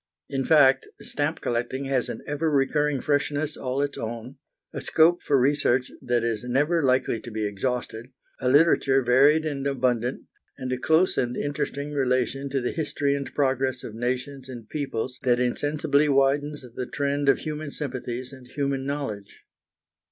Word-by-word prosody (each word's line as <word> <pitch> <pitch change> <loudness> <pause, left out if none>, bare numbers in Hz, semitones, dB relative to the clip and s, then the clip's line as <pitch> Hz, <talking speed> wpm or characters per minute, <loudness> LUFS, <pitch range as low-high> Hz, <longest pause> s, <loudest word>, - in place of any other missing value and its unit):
In 135 -1 -1
fact, 135 -4 +5
stamp 145 +2 -2
collecting 125 +3 -2
has 135 -2 0
an - - -6
ever 150 +2 -1
recurring 145 0 +1
freshness 145 +1 0
all 130 +2 -2
its 145 - -4
own, 115 +4 -6 0.4
a - - -4
scope 165 +2 +4
for 140 -2 +2
research 130 -1 +2
that 120 -1 0
is 115 -2 -1
never 145 +7 +1
likely 130 -3 +2
to 120 - -9
be 110 -1 -3
exhausted, 115 +2 -3 0.3
a 125 - 0
literature 135 -2 +4
varied 140 +6 +5
and 140 -3 -2
abundant, 125 -2 0 0.3
and 130 -2 -4
a 125 - -3
close 160 +7 +3
and 125 0 -1
interesting 145 0 -3
relation 130 0 0
to 135 -1 -1
the 125 - -1
history 145 -3 -1
and 140 -1 -3
progress 130 -2 0
of 110 - -7
nations 130 +3 -3
and 120 -4 -9
peoples 130 -4 -3
that 125 -2 +2
insensibly 145 +3 +1
widens 140 +1 +1
the 125 - -4
trend 140 0 0
of - - +5
human 155 -1 -5
sympathies 130 -3 -5
and 130 -2 -13
human 140 0 -2
knowledge. 125 -9 -5
135 Hz, 160 wpm, -25 LUFS, 125-145 Hz, 0.4 s, fact